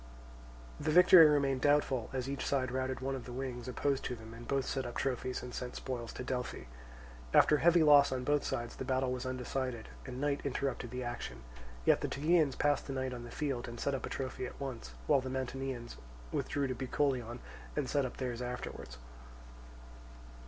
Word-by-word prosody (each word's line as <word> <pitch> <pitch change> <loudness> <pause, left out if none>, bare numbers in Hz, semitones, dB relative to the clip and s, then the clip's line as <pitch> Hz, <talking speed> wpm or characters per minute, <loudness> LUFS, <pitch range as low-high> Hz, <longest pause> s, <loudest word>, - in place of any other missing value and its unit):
The 150 - -1
victory 175 0 +9
remained 140 -3 +2
doubtful, 145 -4 +2
as 130 -1 -2
each 140 0 -3
side 130 -3 0
routed 130 0 -2
one 135 +1 -1
of 130 -2 -5
the 125 - -8
wings 125 -1 -4
opposed 135 +2 0
to 125 - -2
them, 110 0 -11
and 115 +1 -10
both 135 -1 0
set 135 - -1
up 120 -1 -6
trophies 130 -1 -2
and 125 -1 -7
sent 125 -1 -5
spoils 120 -3 -4
to - - -5
Delphi. 125 - -3 0.7
After 150 - +7
heavy 170 +1 +5
loss 145 -2 +7
on 130 -1 -1
both 145 +2 +2
sides 120 0 -3
the - - -3
battle 130 -1 0
was 125 0 -3
undecided, 130 -2 -3 0.2
and 125 0 -5
night 145 0 0
interrupted 135 -1 -2
the 125 0 -4
action; 90 - -5 0.4
yet - - +5
the - - 0
Tegeans 155 -1 +2
passed 145 -1 +2
the 135 - -3
night 130 -1 -2
on 120 -1 -6
the - - -9
field 135 -1 -2
and 120 0 -7
set 140 - 0
up 135 - -2
a - - -7
trophy 130 -1 -3
at - - -11
once, 120 - -6
while 135 - +4
the 130 - -5
Mantineans 130 -2 -4 0.3
withdrew 140 -1 -1
to 130 - -1
Bucolion 130 -2 -1 0.4
and 150 -3 0
set 145 +1 +1
up 130 - -4
theirs 125 -2 -3
afterwards. 125 - -6
130 Hz, 195 wpm, -33 LUFS, 125-140 Hz, 0.7 s, victory